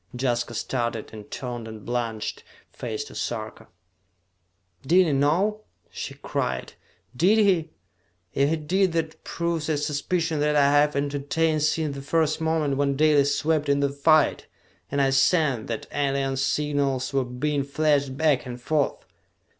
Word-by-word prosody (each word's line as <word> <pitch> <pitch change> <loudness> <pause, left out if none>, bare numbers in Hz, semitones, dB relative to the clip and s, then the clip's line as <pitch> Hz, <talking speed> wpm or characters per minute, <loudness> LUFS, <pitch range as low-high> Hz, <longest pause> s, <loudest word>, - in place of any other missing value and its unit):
Jaska 120 -2 -1
started, 115 -2 -3
and 105 -1 -10
turned 120 -3 -5
a - - -7
blanched 115 0 -4 0.3
face 115 +2 -4
to - - -12
Sarka. 110 -2 -5 1.1
"Did 180 +6 +4
he 160 - 0
know?" 175 +10 +1 0.3
she - - -6
cried. 65 0 -3 0.4
"Did 185 - +4
he? 185 -7 +3 0.6
If 140 +1 +2
he 165 - +2
did 175 +4 +1
that 160 -1 -3
proves 170 -2 -2
a 155 - +1
suspicion 155 +2 -1
that 150 0 +1
I 140 -1 +5
have 145 +1 +3
entertained 145 +3 0
since 155 -1 0
the 140 - -6
first 155 +2 0
moment 160 -4 0
when 140 -1 +1
Dalis 145 -1 +3
swept 155 -2 0
into 140 0 +2
the - - -8
fight, 155 +1 +3 0.4
and 140 - -1
I 135 -1 +3
sensed 135 -3 +2
that 115 -2 -4
alien 135 -1 0
signals 140 -1 0
were 135 -1 +2
being 140 +4 -2
flashed 140 -1 +1
back 150 -5 +2
and 125 0 -6
forth!" 145 +3 -1
145 Hz, 150 wpm, -25 LUFS, 135-155 Hz, 1.1 s, I